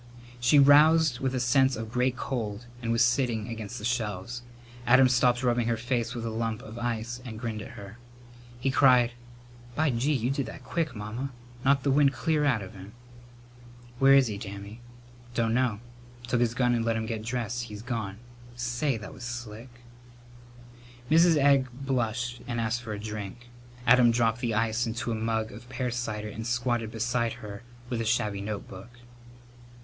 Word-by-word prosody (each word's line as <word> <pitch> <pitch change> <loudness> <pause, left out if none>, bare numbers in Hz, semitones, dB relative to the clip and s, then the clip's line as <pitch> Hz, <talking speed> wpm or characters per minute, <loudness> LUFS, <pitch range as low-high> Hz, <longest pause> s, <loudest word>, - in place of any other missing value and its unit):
She 120 +5 +4
roused 145 -1 +6
with 130 -1 -1
a - - 0
sense 130 +1 +3
of 110 0 -6
great 125 +1 +1
cold 115 -4 -4 0.2
and 115 -1 -2
was 115 0 +4
sitting 120 -3 0
against 115 0 -6
the 105 - -6
shelves. 115 -1 -2 0.5
Adam 130 +2 +7
stopped 125 0 +3
rubbing 120 -2 +2
her 115 -1 +1
face 120 0 -2
with 115 -1 -4
a 115 - -2
lump 110 -1 -2
of 110 +2 -9
ice 120 +1 -3
and 115 -4 -7
grinned 110 -2 -4
at - - -10
her. 100 +3 -10 0.6
He 135 +2 0
cried, 125 -3 +5 0.6
"By 155 -1 +2
gee, 125 +5 0
you 125 -1 0
did 140 -1 -2
that - - -9
quick, 160 -7 -2
Mamma! 110 +6 -4 0.3
Knocked 135 0 +3
the 140 - +2
wind 140 0 +4
clear 150 +4 +1
out 120 -8 +2
of 95 - -10
him." 100 +2 -11 1.1
"Where 135 0 +7
is 135 -1 +6
he, 105 -4 -4
Dammy?" 100 +2 -8 0.5
"Dunno. 115 -1 +1 0.5
Took 120 - +1
his 115 -1 +1
gun 120 -1 +2
and 115 -1 +1
let 115 0 +1
him 110 0 -2
get 110 -1 -3
dressed. 120 0 -3
He's 105 -1 -9
gone. 110 -6 -4 0.4
Say, 120 +2 -1
that 110 - -9
was - - -13
slick!" 120 -1 -6 1.4
Mrs. 165 0 +6
Egg 140 -2 +4
blushed 120 -2 -2
and 120 -1 -2
asked 115 +1 -1
for 115 -3 -5
a 105 - -5
drink. 110 +2 -7 0.4
Adam 120 0 +6
dropped 115 -1 +2
the 115 -3 -1
ice 115 +2 +1
into 120 +1 -3
a - - 0
mug 110 0 -1
of 120 +4 -12
pear 125 -1 -2
cider 110 -3 -3
and 110 +2 -6
squatted 120 -1 0
beside 115 +1 -1
her 100 0 -9 0.3
with 120 -2 -2
a - - -2
shabby 105 -3 0
notebook. 100 0 -6
120 Hz, 180 wpm, -28 LUFS, 110-125 Hz, 1.4 s, Adam